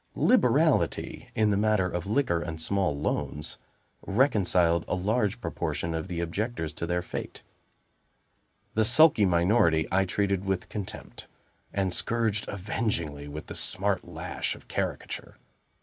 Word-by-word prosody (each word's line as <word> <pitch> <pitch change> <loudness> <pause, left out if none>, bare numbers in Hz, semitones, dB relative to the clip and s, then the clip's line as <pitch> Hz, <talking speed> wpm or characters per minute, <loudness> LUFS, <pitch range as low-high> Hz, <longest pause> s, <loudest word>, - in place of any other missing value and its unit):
Liberality - - +2
in 110 -1 +3
the 100 - +2
matter 105 -2 +2
of 90 0 -4
liquor 105 -7 +1
and 80 -1 -5
small 90 -3 0
loans, 75 0 -2 0.5
reconciled 95 -8 +3
a - - 0
large 105 +4 0
proportion 85 -7 -3
of 80 +1 -3
the 85 -2 -3
objectors 85 -2 -3
to 85 - -4
their 90 0 0
fate; - - -6 1.3
the 110 - +3
sulky 125 -2 +6
minority 85 -3 +3
I 95 +1 +3
treated 100 +1 0
with 95 -2 -2
contempt, 100 -3 -7 0.4
and 95 -2 0
scourged 110 -1 0
avengingly 90 -7 -3
with 75 +1 -7
the - - -8
smart - - 0
lash - - -4
of - - -16
caricature. - - -4
95 Hz, 135 wpm, -28 LUFS, 85-105 Hz, 1.3 s, sulky